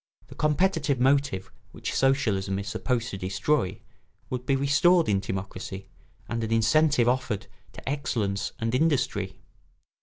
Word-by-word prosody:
The - - -10
competitive 150 -3 +1
motive 135 -7 +1 0.2
which - - -4
socialism 105 -8 +1
is 100 0 -5
supposed 120 +3 -1
to 95 - -5
destroy 95 +3 0 0.5
would 125 0 -4
be 135 - +3
restored 145 +6 +4
in 100 -2 +2
timocracy, 95 0 -6 0.4
and 115 -1 -2
an 110 - -3
incentive 120 +3 +3
offered 125 -5 0 0.3
to - - -12
excellence 110 -8 -1
and 115 +1 -2
industry. 125 -10 +1
120 Hz, 130 wpm, -27 LUFS, 100-140 Hz, 0.5 s, restored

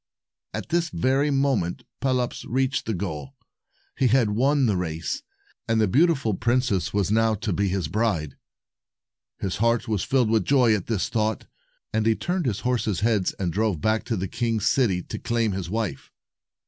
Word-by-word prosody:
At - - -6
this 170 0 +1
very 135 +2 +1
moment, 135 -11 0 0.2
Pelops 125 -2 0
reached 130 +1 0
the 110 - 0
goal. 80 -7 -5 0.6
He 135 - +2
had 120 -3 +3
won 135 +5 +2
the 105 -4 +2
race, 85 - -3 0.5
and 115 -1 +2
the 110 - +3
beautiful 140 - +3
princess 120 -2 0
was 100 -1 0
now 110 0 +3
to 105 -1 -2
be 100 +3 +1
his 95 -4 -1
bride. 90 - -1 1.0
His 95 -2 -3
heart 115 +3 +1
was 105 -4 0
filled 125 -5 +2
with 110 -1 +3
joy 125 -5 +4
at 105 -4 -2
this 110 -5 0
thought, 110 -1 -1 0.5
and 110 0 +1
he 110 - +4
turned 175 +1 -2
his 100 -4 -1
horses' 115 -6 0
heads 105 -4 +1
and 90 -4 -3
drove 105 -5 0
back 110 +7 +1
to 115 - -1
the 95 +1 -2
king's 115 0 -1
city 95 -10 +2
to - - -6
claim 115 -2 0
his 95 -3 -4
wife. 105 -9 -3
110 Hz, 175 wpm, -25 LUFS, 95-125 Hz, 1.0 s, joy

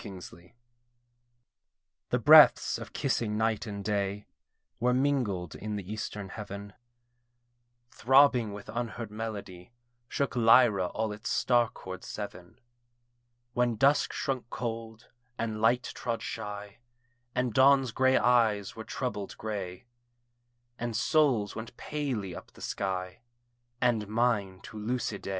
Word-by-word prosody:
DREAM 95 -2 -8
TRYST 90 +1 -13 1.6
The - - +2
breaths - - +7
of - - -9
kissing 115 -5 -1
night 110 +1 0
and 100 -2 -6
day 100 -1 -1 0.5
Were 125 +1 +2
mingled 125 - 0
in 105 0 -5
the 100 0 -5
eastern 105 -2 -5
Heaven: 100 -1 -8 1.2
Throbbing 130 -3 +4
with 100 0 -9
unheard 115 -1 -4
melody 105 -3 -7 0.3
Shook 140 +1 -2
Lyra 115 -5 +5
all 110 +3 -2
its 105 +1 -6
star 120 -2 +2
chord 95 0 -9
seven: 95 -1 -8 0.9
When 120 -1 +1
dusk 140 +6 +3
shrunk 130 -4 -3
cold, 115 -1 -6 0.3
and 110 -2 -3
light 120 +3 +3
trod 115 -2 -3
shy, 105 +1 -6 0.6
And 125 -2 0
dawn's 135 0 +5
grey 130 +3 +3
eyes 115 -5 +2
were 110 - -7
troubled 110 -5 -4
grey; 100 -2 -5 0.9
And 120 -1 -3
souls 125 -5 +2
went 110 +2 -8
palely 125 - -3
up - - -11
the - - -16
sky, 95 -1 -3 0.6
And 115 -4 +1
mine 105 -4 0
to 110 - -10
Lucidé. 110 -2 -3
110 Hz, 125 wpm, -29 LUFS, 100-120 Hz, 1.6 s, breaths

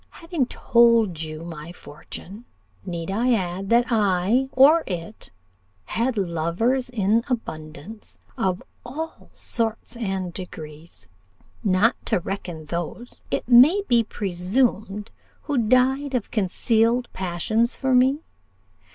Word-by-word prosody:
Having 330 -7 0
told 230 -10 +3
you 155 0 -6
my 165 -1 -8
fortune, 180 +6 -10 0.4
need 170 0 -4
I 240 +5 +2
add, 190 -2 -2
that 240 +2 +3
I, 210 +4 +2
or 300 +5 +6
it, 180 +2 -6 0.6
had 235 +1 -1
lovers 190 +9 0
in 225 -1 +2
abundance 160 - -6 0.2
of 185 -1 -1 0.2
all 315 +6 -7
sorts 230 0 -2
and 190 -6 -3
degrees 155 - -8 0.6
not 205 +3 +3
to - - +2
reckon 175 -3 -6
those, 170 +10 -6
it - - -2
may 270 +12 +7
be 235 -1 +4
presumed, 205 +2 -1 0.3
who 285 -4 0
died 255 +4 +2
of 235 - -2
concealed 230 +4 +1
passions 190 +6 0
for 265 -1 0
me? 265 +5 +3
215 Hz, 115 wpm, -24 LUFS, 180-245 Hz, 0.6 s, may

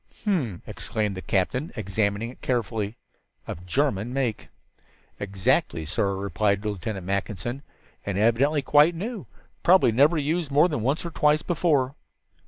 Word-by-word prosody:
"H'm," 150 - -1
exclaimed 105 -2 -3
the 95 - -5
captain, 115 - -1
examining 105 +2 -1
it - - -18
carefully. 115 -3 -2 0.5
"Of 90 +2 -7
German 120 - 0
make." 130 -4 -2 0.7
"Exactly, 95 -5 0
sir," 100 +4 0
replied 100 +1 0
Lieutenant 100 -2 -4
Mackinson, 100 +6 -3 0.4
"and 100 -1 -3
evidently 130 +7 +3
quite 150 +5 +5
new 210 +4 -5 0.3
probably 180 -8 +5
never 145 +8 +4
used 155 +2 -1
more 145 +4 +5
than 150 -9 -2
once 135 +9 0
or 170 - -4
twice 150 0 +2
before." 150 -6 +1
120 Hz, 135 wpm, -25 LUFS, 100-150 Hz, 0.7 s, quite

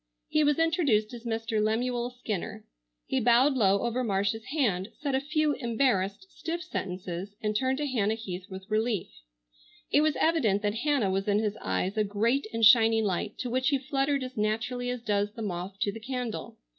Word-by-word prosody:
He 305 - +3
was 295 -1 +3
introduced 300 - +2
as 240 0 -9
Mr. 225 -1 -1
Lemuel 240 +2 0
Skinner. 220 -3 -5 0.4
He 265 - 0
bowed 245 +4 +5
low 200 -6 +3
over 240 +2 0
Marcia's 205 +1 0
hand, 225 - 0
said 285 -2 -2
a 265 - +3
few 300 +2 +1
embarrassed, 235 - 0
stiff 335 +1 -4
sentences 185 - -5
and 210 -1 -2
turned 260 +3 +1
to 295 - -1
Hannah 220 -6 +1
Heath 190 -4 -7
with 190 0 -8
relief. 220 -1 0 0.8
It 290 - +5
was 310 -1 +2
evident 230 -12 +2
that 205 0 +1
Hannah 240 -4 +1
was 195 +1 -1
in 205 0 +3
his 210 -1 0
eyes 180 - -1
a 215 - +3
great 220 +6 0
and 230 -1 +3
shining 225 0 +6
light, 205 +1 -2
to 250 - -3
which 260 +2 +2
he 280 - +2
fluttered 275 +1 0
as 255 0 -7
naturally 240 +4 -1
as 250 -1 -4
does 205 -2 0
the 225 -1 -6
moth 185 0 -4
to 200 - +1
the 225 - -8
candle. 245 -1 -5
225 Hz, 190 wpm, -28 LUFS, 205-260 Hz, 0.8 s, shining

